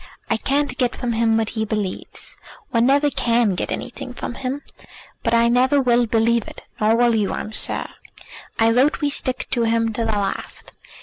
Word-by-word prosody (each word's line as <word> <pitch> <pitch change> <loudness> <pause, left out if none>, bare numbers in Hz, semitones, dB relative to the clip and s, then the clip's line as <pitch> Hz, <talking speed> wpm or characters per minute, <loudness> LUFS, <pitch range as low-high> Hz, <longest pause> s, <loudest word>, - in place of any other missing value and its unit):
I 225 - +3
can't 275 +2 -1
get 250 -1 +1
from 240 -2 -2
him 225 0 +2
what 225 -1 0
he 220 -1 -2
believes. 210 -3 -3 0.4
One 230 +1 +3
never 285 +2 +3
can 235 -5 +2
get 180 - -3
anything 250 0 -5
from - - -5
him. 270 +3 -4 0.6
But - - +1
I 235 0 +4
never 255 +4 +3
will 240 -2 +3
believe 230 +1 +2
it; - - -11 0.2
nor 220 +1 +3
will 240 0 +4
you, 210 -3 +1
I'm 215 - -4
sure. - - -2 0.7
I 225 0 +4
vote 260 +6 +3
we 290 -1 +1
stick 255 -2 -2
to 240 - +1
him 225 0 +1
to 230 - -1
the 220 -1 0
last. 200 -1 -3
235 Hz, 190 wpm, -21 LUFS, 225-255 Hz, 0.7 s, I